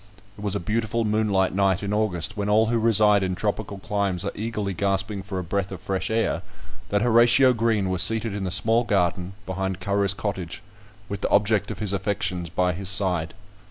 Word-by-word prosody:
It - - -12
was 100 -1 -1
a - - 0
beautiful 110 +4 -1
moonlight 105 -3 +1
night 95 0 +1
in 100 +1 -2
August, 105 -2 -1
when 105 -1 -2
all 110 +2 +4
who 115 +1 0
reside 105 -2 +4
in 95 -1 -1
tropical 100 0 -3
climes 100 -2 -1
are 100 - -2
eagerly 105 -3 -3
gasping 95 +2 -1
for 95 0 -6
a 90 - -2
breath 100 +3 -2
of 95 - -6
fresh 95 0 -3
air, 110 0 0 0.5
that 100 +1 +1
Horatio 120 +2 +5
Green 110 -4 +1
was 95 0 +2
seated 110 -1 +3
in 100 -1 -4
the 95 - -2
small 115 +5 +2
garden 95 -3 0
behind 95 0 -3
Currer's 100 +1 +1
cottage, 95 -2 -5 0.4
with 100 - -5
the - - -1
object 105 0 +2
of - - -5
his 105 -2 -1
affections 95 -3 -2
by 90 +1 0
his 95 +2 -4
side. 90 -5 0
100 Hz, 195 wpm, -24 LUFS, 95-110 Hz, 0.5 s, Horatio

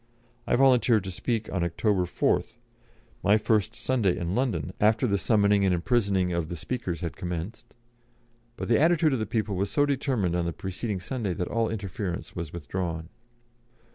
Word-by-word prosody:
I - - +3
volunteered 125 -5 +4
to 95 - -5
speak 110 +4 -2
on 90 -3 0
October 90 +2 +1
4th 90 - 0 0.6
(my 105 +2 +4
first 110 0 +1
Sunday 115 -7 +1
in 85 +1 -2
London 110 - -1
after 110 +4 +4
the 100 -4 +1
summoning 100 0 +3
and 95 -2 +3
imprisoning 95 -2 +1
of 85 -2 -2
the 85 - -4
speakers 95 0 -4
had 85 -2 -4
commenced), 90 +3 -6 0.8
but - - -4
the 115 - +4
attitude 160 -2 +4
of 130 - 0
the 110 - -2
people 110 -3 -1
was 100 +2 -1
so 145 +5 +3
determined 130 - 0
on 85 -1 0
the 85 - -2
preceding 95 +3 -4
Sunday 100 -2 -3
that 90 -3 -3
all 115 0 0
interference 100 -4 -4
was 85 -3 -5
withdrawn. 85 0 -4
100 Hz, 170 wpm, -27 LUFS, 90-115 Hz, 0.8 s, volunteered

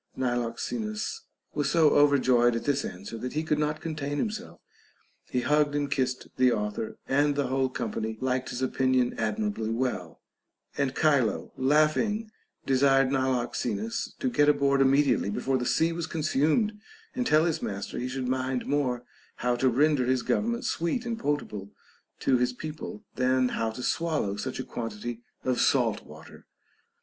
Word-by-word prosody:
Niloxenus 210 - -2 0.3
was 145 -2 0
so 160 -2 +5
overjoyed 130 -5 +4
at 115 - -2
this 140 -1 +1
answer, 100 +5 -7
that 125 - -4
he 155 +2 -1
could 150 -1 0
not 150 0 0
contain 150 -3 -3
himself. 215 +6 -4 0.7
He 125 - 0
hugged 145 +2 +2
and 145 -1 -1
kissed 130 -2 -1
the 130 -1 +5
author, 105 0 -3
and 145 +1 +2
the 145 -1 +1
whole 130 0 +1
company 110 -3 -3
liked 130 0 -1
his 125 +1 -3
opinion 130 -1 +2
admirably 210 - -1
well; 115 -8 -2 0.6
and 135 -2 -1
Chilo 140 -8 +2
laughing 155 - +2 0.3
desired 135 0 +4
Niloxenus 130 - -1
to 270 - -2
get 145 -9 +4
aboard 140 -1 +3
immediately 135 -5 +3
before 130 +5 0
the 125 - -2
sea 165 +1 +2
was 165 -1 -3
consumed, 155 - +1 0.4
and 250 -1 -1
tell 155 +2 +4
his 165 -3 0
master 100 0 -4
he 125 - -2
should 130 -1 -3
mind 130 0 -1
more 130 -4 0 0.3
how 125 0 0
to 130 +2 +2
render 140 0 +3
his 130 -2 +1
government 235 +2 0
sweet 170 +9 -1
and 230 -1 -3
potable 105 - -2 0.5
to 130 - +3
his 125 0 +1
people, 155 -5 -7
than 130 0 +2
how 115 -2 -1
to 115 +3 -7
swallow 155 -13 0
such 130 +6 -4
a - - -2
quantity 115 0 -5 0.2
of 130 -1 +1
salt - - +2
water. - - -14
135 Hz, 160 wpm, -28 LUFS, 125-150 Hz, 0.7 s, so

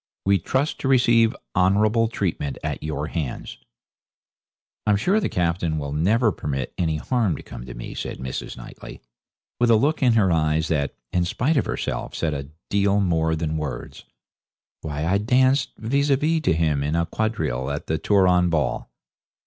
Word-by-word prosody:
We 100 0 +4
trust 130 - -1
to - - -2
receive 120 -2 +4 0.2
honourable 105 +5 +3
treatment 85 - -2
at - - -3
your 75 -1 -3
hands.' 75 -5 -5 1.3
'I'm 105 - +5
sure 190 - +2
the 210 - -1
Captain 85 -2 0
will 70 -1 -4
never 105 +9 +2
permit 70 -6 -4
any 80 -3 0
harm 110 - 0
to - - -9
come - - -9
to 65 - -8
me,' - - -7
says - - -5
Mrs. 65 0 -5
Knightley, - - -10 0.6
with 120 0 +3
a 115 - +7
look 145 +8 +1
in 125 -3 +4
her 100 -5 +3
eyes 80 0 +1
that, 70 -3 -1 0.2
in 90 - +2
spite 125 - 0
of 135 - +2
herself, - - -3
said 80 -2 -1
a 70 -1 -5 0.2
deal 100 0 +3
more 80 -4 +1
than 80 -1 -2
words. 75 -4 -6 0.8
'Why, 75 0 -3
I 95 +4 +2
danced 130 +5 +3
"vis 140 +6 0
a 140 - +5
vis" 160 +3 +1
to - - +4
him 80 -3 +1
in 75 +3 -1
a 85 0 +1
quadrille 80 - -2
at 70 0 -4
the 80 +1 -1
Turon 90 -1 +3
ball.' 80 -3 -1
90 Hz, 175 wpm, -23 LUFS, 75-115 Hz, 1.3 s, a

